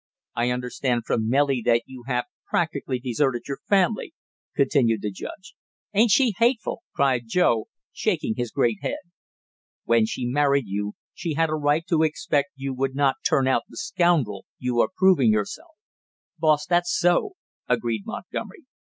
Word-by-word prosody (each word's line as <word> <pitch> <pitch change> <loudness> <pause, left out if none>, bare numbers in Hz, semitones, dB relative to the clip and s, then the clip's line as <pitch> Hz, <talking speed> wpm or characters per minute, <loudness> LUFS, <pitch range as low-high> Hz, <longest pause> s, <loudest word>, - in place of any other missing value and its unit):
"I 120 +1 0
understand 125 0 -1
from 110 -1 0
Nellie 135 -1 +2
that 120 0 +3
you 130 -2 -12
have 125 -2 0 0.2
practically 145 -6 -1
deserted 125 0 -1
your 140 - -4
family," 200 - +1 0.4
continued 130 -6 +2
the 105 - -2
judge. 190 - -9 0.4
"Ain't 220 +3 +4
she 240 +2 +4
hateful?" 235 -1 +1
cried 130 -4 +2
Joe, 115 -6 +2 0.3
shaking - - 0
his 120 -2 -2
great 115 -3 0
head. - - -2 0.9
"When 115 -1 +3
she 125 - -3
married 140 +1 +2
you, 105 +1 -3 0.2
she 165 -4 -4
had 165 +1 +2
a - - +1
right 150 +2 +1
to 165 -3 +1
expect 150 -2 0
you 135 0 -4
would 135 +1 -2
not 140 -1 +2
turn 135 -1 +2
out 130 -3 +3
the - - -13
scoundrel 165 - +1
you 125 -1 -1
are - - +1
proving 180 - +5
yourself." 110 - -3 0.6
"Boss, 150 -2 +3
that's 175 +1 +1
so," 175 - +2 0.4
agreed 115 -3 0
Montgomery. - - -7
135 Hz, 155 wpm, -24 LUFS, 120-165 Hz, 0.9 s, proving